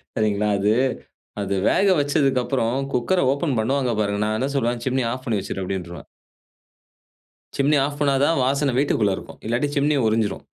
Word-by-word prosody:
சரீங்களா! 105 -1 0
அது, 105 +2 +2 0.7
அது 100 0 -2
வேக 200 - +2
வச்சதுக்கப்பறம் 135 -3 0
குக்கர 180 +10 +1
ஓப்பன் 140 -4 -1
பண்ணுவாங்க 130 +2 0
பாருங்க. 100 0 -1
நான் 110 0 -1
என்ன 130 - 0
சொல்லுவேன், 120 -1 -1
"சிம்னி 130 0 0
ஆஃப் 130 0 -7
பண்ணி 110 -4 0
வச்சிரு" 95 - -5
அப்டீன்றுவேன். 90 -2 -6 1.5
சிம்னி 145 +2 +3
ஆஃப் 145 +1 -3
பண்ணா 140 -2 +2
தான் 165 0 +2
வாசன 140 0 +1
வீட்டுக்குள்ள 105 -8 +1
இருக்கும். - - -11
இல்லாட்டி 120 +5 0
சிம்னி 145 +1 +2
உறிஞ்சிரும். 110 -1 -1
125 Hz, 155 wpm, -22 LUFS, 110-140 Hz, 1.5 s, சிம்னி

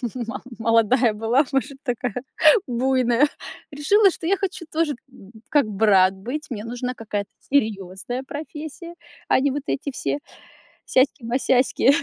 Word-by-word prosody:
мо 240 +1 -5 0.2
молодая 230 +1 +3
была, 230 +7 +2
может, 270 +1 -1
такая 245 -4 -2 0.5
буйная. 255 +2 +2 0.4
Решила, 390 +8 +4
что 330 -1 -6
я 395 - +3
хочу 380 -3 -4
тоже 315 -3 0
б 215 -6 -16 0.2
как 290 -7 +3
брат 195 -2 +4
быть, 250 +11 -5
мне 220 -3 -5
нужна 245 +2 -4
какая-то 205 -3 -4 0.2
серьезная 215 0 -1
профессия, 310 +4 -8 0.3
а - - +5
не 280 0 +1
вот 285 0 -3
эти 280 0 -2
все - - -2 0.7
сяськи-масяськи, 260 -1 +2
255 Hz, 130 wpm, -23 LUFS, 225-290 Hz, 0.7 s, а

